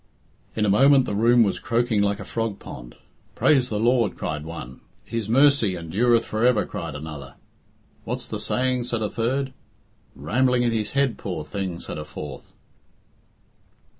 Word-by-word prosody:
In 110 - +1
a - - +1
moment 135 +6 +5
the - - -3
room 115 +3 +5
was 100 - -1
croaking 115 -2 +1
like 100 0 0
a - - -7
frog 115 -3 -3
pond. - - -10 0.4
"Praise 130 -4 +3
the 105 - -2
Lord!" 115 -3 +2
cried 75 -1 -4
one. 70 -6 -8 0.2
"His 115 -2 -4
mercy 130 -5 +4
endureth 110 +8 +1
for 110 +1 -2
ever," 125 -3 +4
cried - - -6
another. 75 -3 -8 0.7
"What's - - -5
he - - -3
saying?" 125 -1 0
said 120 -2 -2
a 105 - -2
third. 130 +3 -1 0.6
"Rambling 120 - +1
in 120 - +2
his 110 -2 -2
head, 140 -3 +1
poor 90 -6 -4
thing," 95 -1 -4
said - - -7
a 75 - -6
fourth. 75 -2 -9
110 Hz, 165 wpm, -24 LUFS, 95-125 Hz, 0.7 s, moment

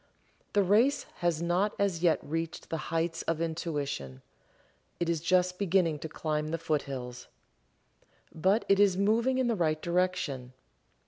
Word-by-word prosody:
The 205 - +4
race 220 +9 +3
has 170 -2 0
not 180 +5 +1
as 195 -5 0
yet 170 -2 +4
reached 165 +2 -4
the 165 - 0
heights 165 0 -1
of 165 -1 0
Intuition 145 - -3 0.8
it 170 - 0
is 165 -2 0
just 180 +1 +2
beginning 180 -5 +2
to 160 - -6
climb 155 -1 -2
the 165 +2 -2
foothills. 135 -6 -3 1.1
But 190 +7 +2
it 195 0 +4
is 200 -3 +4
moving 230 +6 +2
in 260 - +2
the 240 - +2
right 155 -4 +1
direction. 170 -8 -1
170 Hz, 145 wpm, -30 LUFS, 155-190 Hz, 1.1 s, The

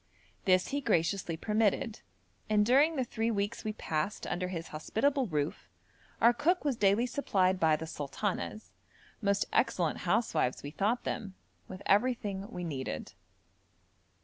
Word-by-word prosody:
This 185 -1 +3
he 285 +1 -1
graciously 180 - 0
permitted, 215 +2 0 0.5
and 210 -1 +4
during 285 +7 +4
the 265 - +1
three 225 -1 -1
weeks 205 -1 -2
we 215 -1 -2
passed 160 0 -2
under 180 +1 -2
his 170 -2 -5
hospitable 260 - 0
roof, 150 -3 -2 0.5
our 235 +1 +6
cook 345 +7 +1
was 280 -4 +2
daily 205 +2 +3
supplied 190 -8 +1
by 160 -2 +4
the 160 +1 -5
'sultanas' 180 +8 -4 0.5
most 200 -1 +2
excellent - - +1
housewives 155 - 0
we 145 - -5
thought 210 +8 0
them 195 -3 -4 0.3
with 185 +1 -9
everything 205 -3 +1
we 180 -7 -6
needed. 130 - -4
200 Hz, 140 wpm, -31 LUFS, 175-235 Hz, 0.5 s, our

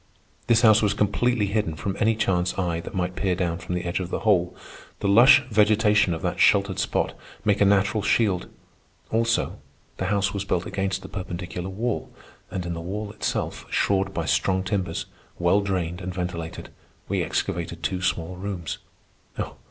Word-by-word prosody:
This 115 -1 +5
house 110 -2 +6
was 105 -2 +2
completely 110 +2 +1
hidden 100 -5 -1
from 95 +6 -3
any 115 0 +3
chance 95 -4 0
eye 85 -3 0
that 85 +4 -8
might 90 0 -1
peer 95 -3 0
down 85 -2 -1
from 90 - -4
the 90 - -2
edge 85 +1 -1
of 90 -2 -4
the - - -3
hole. 95 -6 +2 0.4
The - - -1
lush 120 +8 +7
vegetation 105 -3 +4
of 80 - -8
that - - -2
sheltered 100 -2 +4
spot - - 0 0.3
make 105 -1 +2
a - - +7
natural 100 +2 +3
shield. 100 -3 +1 0.6
Also, 115 +1 +1 0.4
the 95 - -2
house 100 +1 +1
was 100 -1 -2
built 90 -2 -1
against 95 -1 -2
the - - -7
perpendicular 90 -1 -5
wall; 110 +4 -2 0.4
and 90 -2 -4
in 85 - -3
the 85 - -5
wall 100 +4 -4
itself, 105 - -3
shored 95 -1 +1
by 85 -4 -3
strong 95 +3 +1
timbers, 95 -1 -2 0.3
well 90 +4 +3
drained 90 -3 -2
and 95 0 -4
ventilated, 85 -2 -4 0.4
we - - 0
excavated 85 -1 -2
two 90 +5 -1
small 90 0 -1
rooms. 95 -4 -4
95 Hz, 175 wpm, -25 LUFS, 90-105 Hz, 0.6 s, lush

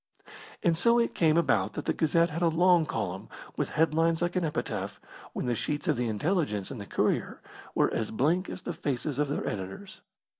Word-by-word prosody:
And 170 -1 +3
so 235 +8 +3
it 235 -1 +1
came 160 -1 +3
about 170 - +2
that 150 - -5
the - - +1
Gazette 165 +1 +2
had 165 +3 -4
a 170 - +4
long 170 0 +4
column, 95 -7 -3 0.3
with - - -1
headlines 165 +1 +2
like 175 +1 -1
an 180 - +1
epitaph, 155 -1 -3 0.3
when - - -3
the 125 - +1
sheets 145 +6 -2
of 155 - +3
the 120 -1 -1
Intelligence 110 - -1
and 125 -6 -6
the 100 - -8
Courier - - 0 0.4
were - - +2
as 110 - -1
blank 160 - +1
as - - -7
the - - -3
faces 140 0 -2
of 150 - +2
their 145 - -2
editors. 100 - -6
155 Hz, 200 wpm, -29 LUFS, 125-170 Hz, 0.4 s, a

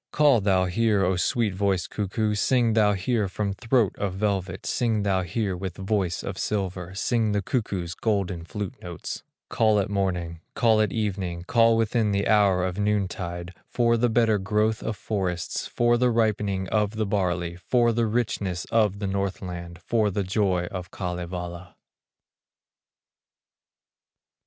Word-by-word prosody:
Call 145 -7 +4
thou 95 -2 +3
here, 100 +1 +2
O 95 +1 +1
sweet 105 +3 +1
voiced 95 -4 0
cuckoo, 105 +1 -1
Sing 115 +2 +2
thou 105 -2 +4
here 105 +2 0
from 100 +1 -2
throat 115 -1 +1
of 100 -2 -2
velvet, 95 -3 -2
Sing 115 -4 0
thou 95 -2 +1
here 95 +2 -2
with 90 -1 -5
voice 95 -3 -1
of - - -5
silver, 95 -3 -3
Sing 110 +1 +1
the 100 - +1
cuckoo's 95 -7 -2
golden 95 -5 -1
flute 100 +2 -5
notes; 85 -2 -6 0.3
Call 110 -2 +3
at 100 - -1
morning, 90 -4 -1 0.2
call 110 -3 +4
at 105 -3 +1
evening, 95 -6 -2
Call 115 +3 +4
within 115 -1 +1
the 100 0 0
hour 100 -4 +4
of 95 +2 -3
noontide, 95 -4 -2
For 115 -1 +2
the 120 +1 +2
better 110 -2 +3
growth 105 +3 0
of 110 - -3
forests, 90 -3 -2
For 120 0 +2
the 125 0 +3
ripening 105 -4 0
of 105 0 +1
the 110 0 0
barley, 90 -4 -1
For 120 +5 +2
the 115 0 +1
richness 105 -6 -1
of, 105 -4 +3
the 100 - -4
Northland, 90 -3 -4
For 110 -3 +1
the 100 +1 -1
joy 95 -2 +1
of 90 -2 -6
Kalevala." 90 -2 -5
100 Hz, 150 wpm, -25 LUFS, 90-110 Hz, 0.3 s, Call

